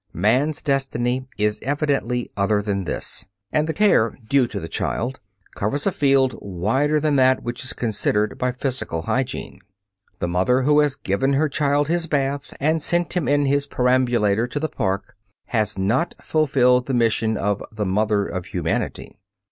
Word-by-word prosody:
Man's 125 - +1
destiny 130 -2 -1
is 105 0 0
evidently 140 -4 -1
other 100 +1 +2
than 100 -2 -2
this, 100 - -3 0.2
and 155 0 +1
the 160 - -1
care 205 - +3
due 135 0 +3
to 100 - -5
the 80 - -6
child 125 +9 -3 0.3
covers 110 +8 -2
a 195 - +3
field 135 -4 +3
wider 115 - 0
than 150 -1 +1
that 130 0 +3
which 120 +1 -4
is 130 - -4
considered 105 -2 0
by 125 0 +1
physical 125 - -3
hygiene. 130 -3 -3 0.6
The 85 - -2
mother 95 +9 +2
who 150 +2 +4
has 145 -2 +2
given 135 +2 0
her 150 +3 +2
child 145 0 +1
his 170 +1 0
bath 140 -1 -1
and 155 +3 +1
sent 175 +3 0
him 175 -5 0
in 145 0 +3
his 140 +1 +1
perambulator 120 -4 +2
to 145 - -3
the 155 - -1
park 100 -6 -3 0.3
has 110 -3 0
not 115 - 0
fulfilled 130 -5 +2
the 135 - 0
mission 110 -2 +1
of 100 0 -1
the 110 -1 -3
"mother 105 +1 +1
of 90 -2 -5
humanity." - - -3
125 Hz, 165 wpm, -22 LUFS, 105-145 Hz, 0.6 s, who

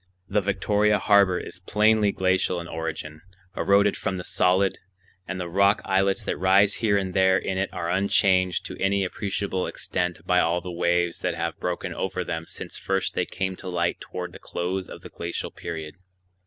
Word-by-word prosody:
The 105 +2 +1
Victoria 105 +2 +2
Harbor 100 -4 +4
is - - -8
plainly 105 +2 +3
glacial 95 -1 +1
in 85 - -7
origin, 80 -2 -5 0.3
eroded 100 +1 +3
from 95 -2 -2
the 90 - -5
solid; 95 +2 +2 0.5
and 95 -1 -4
the 90 - -3
rock 100 +4 +3
islets 95 0 +1
that - - -2
rise 95 +2 +4
here 105 -3 +2
and 95 -2 -2
there 95 -1 +4
in 95 -1 -2
it 95 - -1
are 85 -1 -4
unchanged 95 -1 +2
to - - -8
any 100 0 +2
appreciable 95 -1 -2
extent 90 -2 -3
by 90 0 +3
all 85 +1 +2
the 90 +1 -7
waves 85 0 +1
that 90 -2 -1
have 85 0 -3
broken 90 -1 -3
over 95 -1 -2
them 80 -2 -4
since - - -7
first 95 -1 -1
they - - -1
came 95 0 -3
to 95 - -7
light 85 -1 0
toward 90 -1 -6
the - - -10
close 90 +2 -3
of - - -10
the - - -10
glacial 85 0 -5
period. 80 -2 -6
95 Hz, 185 wpm, -25 LUFS, 90-100 Hz, 0.5 s, Harbor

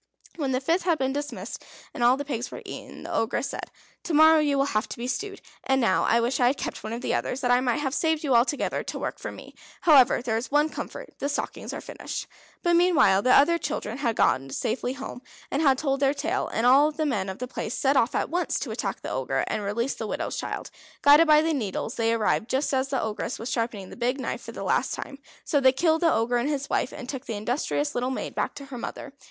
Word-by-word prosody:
When 280 -5 -2
the 255 - +1
fifth 330 +7 +1
had 340 -2 +1
been 265 -1 0
dismissed, 290 +1 -5 0.3
and 250 - -2
all 245 +2 +5
the 285 - -4
pigs 255 -3 -3
were - - -9
eaten, - - -9
the - - -6
Ogress 235 +4 0
said: - - -6 0.4
"To 330 - -1
morrow 315 +1 +7
you 290 -2 +2
will 275 - +3
have 215 -6 -1
to - - -6
be 235 - -4
stewed, 390 +11 -4 0.2
and 265 0 +2
now 230 -7 +2
I 230 - +3
wish 240 +2 0
I 245 - +4
had 265 +2 +1
kept - - -5
one 215 - -5
of 235 +1 -4
the - - -1
others 260 - -2
that 245 -2 +1
I 245 +1 +4
might 250 +2 0
have 270 -2 -2
saved 320 0 +1
you 275 -4 +1
altogether 245 +5 +2
to - - -5
work - - -4
for - - -5
me. - - -12 0.3
However, 270 -7 +5
there 225 -3 0
is 230 - -4
one 295 +2 +3
comfort, - - -7
the 280 - -1
stockings 290 - -4
are - - -6
finished." - - -6 0.4
But 345 0 +3
meanwhile 315 - +4
the 255 - 0
other 335 +4 +5
children 275 -6 -4
had 235 -5 0
got 135 +1 +2
safely 245 +2 -2
home, 270 -2 -7 0.3
and 280 - 0
had 270 -4 +4
told 275 -1 0
their 275 +1 +2
tale. 330 +8 -1
And 225 - -1
all 275 +4 +6
the 310 +1 -2
men 205 -9 -1
of 190 - -5
the 250 - -5
place 245 -2 -4
set 275 +1 +2
off 245 -3 +2
at - - +1
once 355 +1 0
to - - -4
attack - - -4
the - - -4
Ogre, - - -1
and - - -2
release 230 +6 -1
the - - -5
widow's - - -3
child. - - -5 0.3
Guided 295 +3 +7
by 305 0 +6
the 325 0 +1
needles, 225 -3 -3
they 230 -1 +1
arrived 225 0 +1
just 270 +2 0
as 265 0 +1
the 270 -1 -1
Ogress 220 +2 -3
was 230 - -5
sharpening 225 -5 -3
the - - -9
big 250 +3 -1
knife - - -3
for - - -8
the - - -7
last - - +1
time. 275 -1 -8 0.2
So 290 - +1
they 260 -1 +6
killed 320 +4 +2
the 330 -1 +4
Ogre 240 +2 +1
and 240 +4 0
his 280 -2 -3
wife, - - 0
and 250 - -8
took 270 0 -6
the 225 - -3
industrious 275 +6 -1
little 245 +1 -1
maid 260 - -4
back - - -2
to 280 - -8
her 265 -3 -8
mother. 275 +3 -7
265 Hz, 255 wpm, -26 LUFS, 240-295 Hz, 0.4 s, morrow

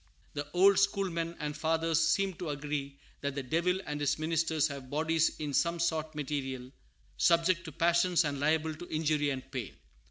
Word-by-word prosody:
The 145 0 -4
old 195 +2 +6
schoolmen 180 -4 0
and 150 -2 -4
fathers 165 +1 +1
seem 190 +4 +2
to 175 -4 -4
agree 145 -1 -4 0.2
that 140 -1 -3
the 140 - -3
Devil 170 +7 +1
and 150 0 -4
his 145 0 +1
ministers 160 -1 +1
have 140 -3 -8
bodies 160 +2 +1
in 150 -2 -4
some 170 +5 +1
sort 160 -2 -1
material, 135 -3 -4 0.5
subject 170 +1 +3
to 160 - -6
passions 170 +1 +3
and 140 -1 -2
liable 155 +2 +1
to 175 +3 -10
injury 155 -2 +1
and 130 -2 -3
pain. 115 - -5
155 Hz, 170 wpm, -31 LUFS, 145-170 Hz, 0.5 s, old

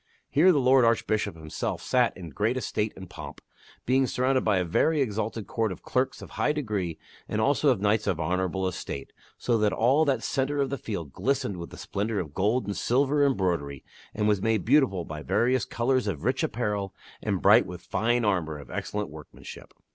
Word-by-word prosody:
Here 170 +6 +6
the 160 - +2
lord 130 0 +5
Arch 115 0 +3
bishop 105 -3 -1
himself 80 -1 -4
sat 125 -2 +1
in 85 -4 -8
great 110 - 0
estate 110 -4 -1
and 95 -1 -9
pomp, - - -9 0.5
being 130 +1 +3
surrounded 130 +1 +1
by 105 -3 +2
a 90 - +1
very 155 - +2
exalted 110 -3 -2
court 115 -3 -1
of 90 - -8
clerks 130 +1 -1
of - - -11
high 150 - +1
degree 105 - -2 0.3
and 105 - -1
also 140 +5 +3
of 125 -6 +2
knights 105 +1 +1
of 85 - 0
honorable 90 +3 -1
estate, 70 -6 -6 0.2
so 120 -2 +1
that 105 -1 +2
all 130 +7 +3
that 140 -3 0
centre 140 +2 -1
of 140 -1 0
the 140 - -1
field 85 - -5
glistered 125 -1 -1
with 85 -1 -7
the - - -11
splendor 105 +1 -2
of 75 -5 -5
gold 105 +6 +1
and 100 0 -3
silver 140 +4 +2
embroidery, 85 - 0 0.3
and 105 -1 -1
was 105 -3 +2
made 110 -3 +1
beautiful 120 - +3
by 75 -1 -7
various 125 +9 +1
colors 125 0 0
of 80 -6 -3
rich 130 +4 +1
apparel 105 - -2 0.3
and 100 -4 -2
bright 105 +4 +6
with 90 -1 -8
fine 120 +1 0
armor 85 -7 0
of 70 -3 -11
excellent 105 +5 -3
workmanship. 75 0 -11
110 Hz, 200 wpm, -27 LUFS, 95-130 Hz, 0.5 s, Here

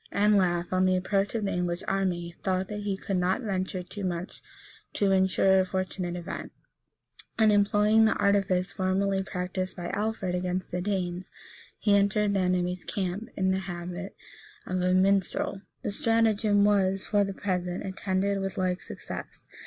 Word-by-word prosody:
Anlaf, 185 -4 +2
on 185 0 +3
the 185 - +3
approach 195 +3 0
of 215 -2 -1
the 195 - -1
English 175 0 -2
army, 180 -3 -1
thought 185 -1 -1
that 210 - -4
he 205 -2 -2
could 195 0 -2
not 185 +7 +1
venture 190 -3 -2
too 200 +3 -7
much 180 0 -4 0.5
to 200 -2 +2
insure 190 0 +4
a - - +4
fortunate 185 -1 -3
event, 175 -1 -6 0.9
and 220 -2 +5
employing 210 +2 +4
the 220 - +3
artifice 195 -2 +1
formerly 190 +1 +1
practised 185 0 -4
by 175 -1 -4
Alfred 205 -3 -2
against 180 0 -2
the 180 - -2
Danes, 185 -2 -2 0.5
he 205 -2 +3
entered 200 +1 +2
the 195 - +1
enemy's 180 -1 0
camp, 195 +2 -3
in 190 -1 +2
the 190 - +1
habit 180 +1 -6 0.5
of 185 0 -2
a 180 0 +2
minstrel. 195 0 +1 0.2
The - - -1
stratagem 215 -1 +3
was, 195 -2 +2
for 205 -1 +2
the 195 -1 -4
present, 180 -2 -2
attended 195 +1 -1
with 195 0 -4
like 185 0 0
success. - - -8
190 Hz, 160 wpm, -28 LUFS, 180-200 Hz, 0.9 s, and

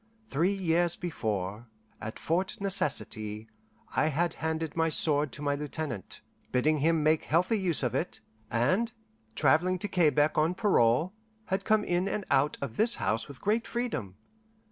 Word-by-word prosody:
Three 170 +4 +1
years 175 -2 +2
before, 110 - -4 0.3
at 110 +1 -6
Fort 180 +4 -2
Necessity, 110 - 0 0.5
I - - +3
had 165 +3 0
handed 160 -1 -3
my 165 0 +2
sword 150 -2 +3
to 150 - -6
my 145 0 +1
lieutenant, 145 - -5 0.3
bidding 150 +4 +2
him 160 +1 +2
make 155 +1 +2
healthy 180 +7 +2
use 175 -7 +1
of 125 -2 0
it, 160 +7 -1 0.3
and, 185 - +1 0.4
travelling 180 +3 +3
to 195 - -3
Quebec 155 -5 +2
on 160 +4 +1
parole, 165 - +2 0.3
had 190 +1 -2
come 215 -1 +3
in 180 0 0
and 200 0 -3
out 145 +3 +2
of 125 -5 -6
this 230 +2 +4
house 110 +1 -1
with 140 -3 -11
great 220 +3 0
freedom. 235 - -3
160 Hz, 155 wpm, -29 LUFS, 135-185 Hz, 0.5 s, this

